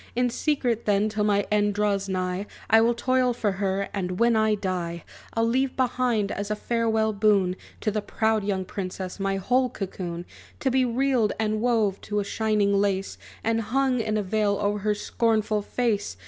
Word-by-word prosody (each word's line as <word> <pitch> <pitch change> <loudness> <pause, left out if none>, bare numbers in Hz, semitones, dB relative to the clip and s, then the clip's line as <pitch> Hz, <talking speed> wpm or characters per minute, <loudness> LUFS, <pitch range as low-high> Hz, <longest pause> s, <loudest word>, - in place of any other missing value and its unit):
In 245 0 +1
secret 245 -5 0
then, 205 +1 +2
till 215 -1 -1
my 205 -1 +2
end 205 -1 +2
draws 200 -1 0
nigh, 185 +1 -2 0.2
I 225 - +7
will 235 +1 +3
toil 255 +1 +2
for 220 -3 0
her; 195 0 -1
and 180 -2 -3
when 235 0 +4
I 220 -1 +3
die, 180 -4 -3 0.3
I'll 225 0 +2
leave 260 +3 0
behind, 245 -5 +1
as 205 +1 -4
a 210 - 0
farewell 220 -1 0
boon 200 -3 +3 0.3
To 215 - 0
the 215 0 -1
proud 220 0 0
young 195 -2 -1
princess, 185 0 -5
my 195 0 0
whole 250 +7 +1
cocoon, 180 -6 -5 0.4
To 265 - +1
be 260 0 +3
reeled, 245 -2 +1
and 215 -1 0
wove 225 -5 +1
to 210 -1 -2
a - - 0
shining 210 -1 +1
lace, 195 -1 0 0.2
And 225 0 +1
hung 255 +3 +1
in 215 -1 0
a 210 - 0
veil 205 +1 +1
o'er 205 0 0
her 210 +1 0
scornful 215 0 0
face! 205 - -1
210 Hz, 185 wpm, -25 LUFS, 200-230 Hz, 0.4 s, I